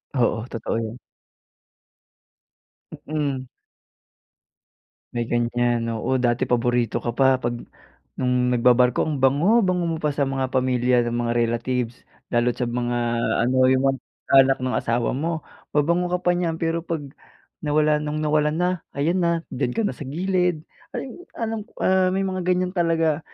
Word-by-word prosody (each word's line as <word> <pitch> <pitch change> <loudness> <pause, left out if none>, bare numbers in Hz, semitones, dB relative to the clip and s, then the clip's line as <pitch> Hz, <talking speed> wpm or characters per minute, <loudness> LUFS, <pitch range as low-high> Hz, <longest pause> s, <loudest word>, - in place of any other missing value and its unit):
Oo, 115 -3 +1
totoo 115 -1 -3
yun. 115 +1 -4 2.1
Mm. 145 -4 -2 1.7
May 120 -1 -2
ganyan 120 0 0
oo 115 +4 -1
dati 120 +1 +1
paborito 120 -1 +1
ka 120 - -1
pa 135 +2 +4
pag 120 -2 -2 0.6
nung 125 -1 +1
nagbabarko 125 0 +4
ang 150 -3 -2
bango-bango 180 - +3
mo 160 - -2
pa 150 -2 -1
sa 140 - +1
mga 135 -1 -1
pamilya 125 -1 +2
na 120 - -2
mga 120 0 -1
relatives 120 +1 0 0.4
lalo 120 0 +2
at - - -22
sa - - +1
mga 120 0 -1 0.5
ano 130 +2 +1
yung 130 0 +3
mga 135 - -6 0.4
anak 135 0 +4
ng 130 - 0
asawa 115 +1 0
mo. 160 +4 -2 0.3
Mabango 170 +4 +2
ka - - -2
pa 175 - +3
niyan 175 -2 0
pero 165 0 -1
pag 165 -2 -4 0.6
nawala 150 0 +2
nung 150 +1 -3
nawalan 150 0 +2
na 180 +2 +1 0.3
ayan 165 +6 +1
na 170 -1 +1
diyan 125 -2 -2
ka 225 - 0
na - - 0
sa 130 +1 -8
gilid 180 +1 0 0.3
ay 265 - -4 0.2
alam 225 -1 -3 0.2
ah, 185 0 +3
may 190 +1 0
mga 185 -1 -2
ganyan 180 0 +1
talaga. 165 -4 +1
135 Hz, 150 wpm, -23 LUFS, 120-165 Hz, 2.1 s, pa